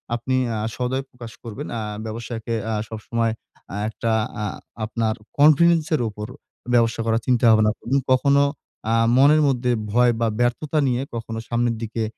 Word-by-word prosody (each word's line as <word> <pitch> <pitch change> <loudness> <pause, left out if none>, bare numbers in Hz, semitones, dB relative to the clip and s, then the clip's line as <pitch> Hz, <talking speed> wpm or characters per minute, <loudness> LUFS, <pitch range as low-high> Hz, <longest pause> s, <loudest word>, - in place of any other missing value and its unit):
আপনি 130 +2 -2 0.2
আ - - -2 0.2
সদায় 130 +2 -1
প্রকাশ 120 -2 -10
করবেন। 120 +5 -6
আ - - -3 0.2
ব্যবসাকে 115 +1 -5
অ্যা 110 -1 -1
সবসময় 115 +1 -2 0.4
আ - - -4
একটা 115 +1 -2 0.3
আ - - -1 0.4
আপনার 110 0 -1 0.2
কনফিডেন্স 155 +2 +5
এর 150 - -1
উপর 105 0 -7 0.5
ব্যবসা 115 -1 +3
করার 115 0 +1
চিন্তা 125 -1 +3
ভাবনা 110 -1 +4
করুন। 135 +4 -1 0.2
কখনো 140 +2 +4 0.5
আ - - +3 0.2
মনের 145 +3 +6
মধ্যে 125 -2 +1 0.2
ভয় 120 +2 +4
বা 115 - +2
ব্যর্থতা 125 +6 0
নিয়ে 125 0 0
কখনো 115 -1 -5
সামনের 120 0 +1
দিকে 115 0 -3
120 Hz, 160 wpm, -22 LUFS, 115-130 Hz, 0.5 s, মনের